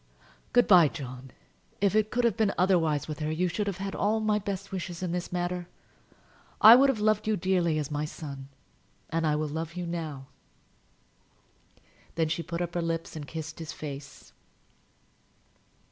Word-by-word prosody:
"Good 245 Hz, 0 st, +5 dB
by, 175 Hz, -5 st, +8 dB
John. 130 Hz, -3 st, -8 dB, 0.5 s
If 200 Hz, -1 st, +2 dB
it 215 Hz, 0 st, +3 dB
could 245 Hz, +1 st, 0 dB
have 235 Hz, -4 st, +3 dB
been 220 Hz, -3 st, +1 dB
otherwise 165 Hz, -6 st, +2 dB
with 155 Hz, -1 st, -5 dB
her, 155 Hz, 0 st, -2 dB
you 175 Hz, +3 st, 0 dB
should 205 Hz, +4 st, -2 dB
have 195 Hz, -3 st, -2 dB
had 195 Hz, 0 st, -4 dB
all 215 Hz, +2 st, +1 dB
my 215 Hz, -1 st, +1 dB
best 195 Hz, -1 st, -5 dB
wishes 180 Hz, -1 st, -5 dB
in 180 Hz, -, -2 dB
the 175 Hz, 0 st, -3 dB
matter. 175 Hz, 0 st, -2 dB, 0.9 s
I 220 Hz, +2 st, +11 dB
would 275 Hz, +2 st, +5 dB
have 255 Hz, -5 st, 0 dB
loved 215 Hz, 0 st, +1 dB
you 215 Hz, -1 st, +2 dB
dearly 175 Hz, -3 st, +1 dB
as 150 Hz, -1 st, -3 dB
my 150 Hz, +1 st, -1 dB
son; 140 Hz, -3 st, -8 dB, 0.6 s
and 165 Hz, 0 st, 0 dB
I 150 Hz, -, +2 dB
will 155 Hz, 0 st, -1 dB
love 160 Hz, +2 st, -5 dB
you 180 Hz, -1 st, -3 dB
now." 160 Hz, -5 st, -5 dB, 1.9 s
Then 160 Hz, -1 st, +1 dB
she 165 Hz, +1 st, -1 dB
put 170 Hz, +1 st, -4 dB
up 170 Hz, -1 st, -5 dB
her 175 Hz, -, -1 dB
lips 165 Hz, -1 st, -3 dB
and 150 Hz, -2 st, -6 dB
kissed 160 Hz, +1 st, -7 dB
his 160 Hz, -2 st, -6 dB
face. 140 Hz, -2 st, -9 dB
170 Hz, 175 wpm, -28 LUFS, 155-195 Hz, 1.9 s, I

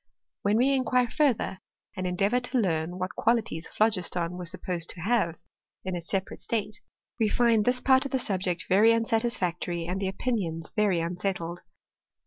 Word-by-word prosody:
When 205 Hz, +2 st, +2 dB
we 265 Hz, +4 st, +3 dB
inquire 250 Hz, -2 st, +1 dB
further, 265 Hz, -, +1 dB, 0.4 s
and 185 Hz, -1 st, -2 dB
endeavour 200 Hz, +7 st, +1 dB
to 250 Hz, +1 st, -3 dB
learn, 175 Hz, -5 st, 0 dB
what 185 Hz, 0 st, -3 dB
qualities 225 Hz, -8 st, 0 dB
phlogiston 180 Hz, -5 st, 0 dB
was 180 Hz, -1 st, -4 dB
supposed 170 Hz, -1 st, 0 dB
to 170 Hz, -, -7 dB
have 200 Hz, -4 st, +1 dB, 0.5 s
in 185 Hz, -1 st, -2 dB
its 170 Hz, -1 st, -6 dB
separate 195 Hz, -1 st, -2 dB
state, 215 Hz, -1 st, -2 dB, 0.4 s
we 220 Hz, -2 st, +3 dB
find 230 Hz, -2 st, +3 dB
this 250 Hz, +1 st, +2 dB
part 265 Hz, 0 st, +4 dB
of 275 Hz, -, -4 dB
the 265 Hz, -, +2 dB
subject 185 Hz, -7 st, -1 dB
very 210 Hz, +5 st, +5 dB
unsatisfactory, 190 Hz, -7 st, +1 dB
and 185 Hz, +3 st, -3 dB
the 195 Hz, -, 0 dB
opinions 190 Hz, -6 st, -2 dB
very 200 Hz, -5 st, +2 dB
unsettled. 175 Hz, 0 st, -3 dB
195 Hz, 160 wpm, -27 LUFS, 175-230 Hz, 0.5 s, very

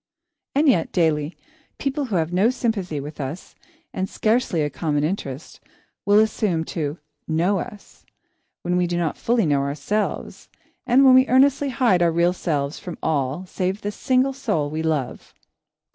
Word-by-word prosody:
And 295 Hz, +3 st, +3 dB
yet, 205 Hz, -12 st, +3 dB
daily, 155 Hz, -2 st, 0 dB, 0.4 s
people 280 Hz, +1 st, -2 dB
who 220 Hz, -6 st, -3 dB
have 165 Hz, 0 st, 0 dB
no 195 Hz, +6 st, +4 dB
sympathy 210 Hz, -, -2 dB
with 145 Hz, +2 st, -7 dB
us, 140 Hz, +7 st, -6 dB, 0.4 s
and 190 Hz, 0 st, -2 dB
scarcely 215 Hz, -8 st, +1 dB
a 145 Hz, -, -1 dB
common 150 Hz, -3 st, -1 dB
interest, 150 Hz, -4 st, -4 dB, 0.5 s
will 205 Hz, +1 st, +5 dB
assume 210 Hz, -6 st, +2 dB
to 150 Hz, -1 st, -3 dB, 0.3 s
"know" 175 Hz, +5 st, +1 dB
us, 205 Hz, +3 st, -10 dB, 0.6 s
when 180 Hz, +1 st, 0 dB
we 180 Hz, -1 st, +2 dB
do 175 Hz, 0 st, -2 dB
not 165 Hz, -3 st, -1 dB
fully 230 Hz, -3 st, +1 dB
know 145 Hz, -2 st, +2 dB
ourselves, 145 Hz, +10 st, -3 dB, 0.4 s
and 260 Hz, +3 st, +5 dB
when 260 Hz, -, +8 dB
we 260 Hz, +1 st, +6 dB
earnestly 275 Hz, +2 st, +3 dB
hide 235 Hz, -8 st, +2 dB
our 170 Hz, -1 st, +4 dB
real 170 Hz, +2 st, +2 dB
selves 150 Hz, -5 st, -2 dB
from 180 Hz, -, -7 dB
all 145 Hz, +3 st, -1 dB
save 185 Hz, +2 st, -3 dB
the 205 Hz, -, -3 dB
single 260 Hz, +5 st, +1 dB
soul 205 Hz, -, -1 dB
we 155 Hz, +1 st, -2 dB
love. 155 Hz, -5 st, -3 dB
180 Hz, 160 wpm, -22 LUFS, 155-225 Hz, 0.6 s, when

